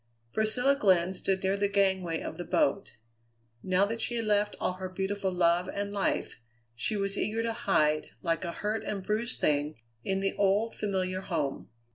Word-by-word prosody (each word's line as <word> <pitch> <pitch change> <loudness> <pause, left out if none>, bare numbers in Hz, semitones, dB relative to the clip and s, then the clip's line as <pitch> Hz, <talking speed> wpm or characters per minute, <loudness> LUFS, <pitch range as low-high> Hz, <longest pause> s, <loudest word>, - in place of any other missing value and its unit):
Priscilla 245 +6 +3
Glenn 185 -7 +3
stood 190 0 -1
near 190 +1 +2
the 200 0 +1
gangway 190 -4 +1
of 160 - -6
the - - -2
boat. 200 - +1 0.7
Now 185 +1 +3
that 230 +2 -3
she 240 - -1
had 230 -1 -1
left 210 0 +1
all - - 0
her 185 0 -6
beautiful 190 +1 -2
love 175 0 +2
and 200 0 -3
life, 195 -10 -1 0.3
she 115 - -2
was 195 0 -1
eager 225 +2 0
to 230 0 -1
hide, 155 -8 +1
like 165 -1 0
a 170 - -2
hurt 210 +5 -2
and 200 -2 -3
bruised 220 +5 -1
thing, 150 +1 +1 0.3
in 195 0 0
the 195 0 0
old, 205 +3 +2
familiar 185 -2 -1
home. 155 -8 -3
195 Hz, 180 wpm, -29 LUFS, 180-210 Hz, 0.7 s, Priscilla